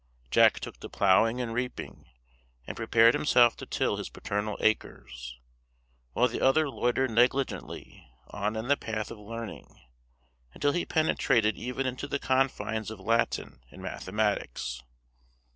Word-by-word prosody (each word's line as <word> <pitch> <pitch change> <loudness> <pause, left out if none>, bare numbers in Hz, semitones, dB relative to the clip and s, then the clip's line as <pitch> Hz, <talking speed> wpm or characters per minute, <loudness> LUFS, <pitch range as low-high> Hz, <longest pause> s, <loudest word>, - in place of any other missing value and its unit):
Jack - - +5
took - - -8
to - - -8
ploughing 110 +5 +3
and 120 -2 -3
reaping, 125 +1 -5 0.6
and - - -6
prepared 115 +1 +4
himself 120 -5 +4
to - - -9
till - - 0
his - - -5
paternal 105 +1 -3
acres; 60 - -2 0.8
while 125 - +3
the 120 - -5
other 145 +4 +4
loitered 130 -1 0
negligently 125 - -1 0.2
on 105 +1 -2
in 110 +2 -4
the 145 - +4
path 110 -5 -4
of 110 - -9
learning, 115 +1 -8 0.8
until 145 - +1
he 175 - -1
penetrated 120 -8 +2
even 125 +2 -3
into 130 +2 -3
the 140 - -1
confines 120 -6 0
of 110 -2 -8
Latin 115 - -1
and 95 - -12
mathematics. 95 - -2
115 Hz, 140 wpm, -28 LUFS, 105-125 Hz, 0.8 s, Jack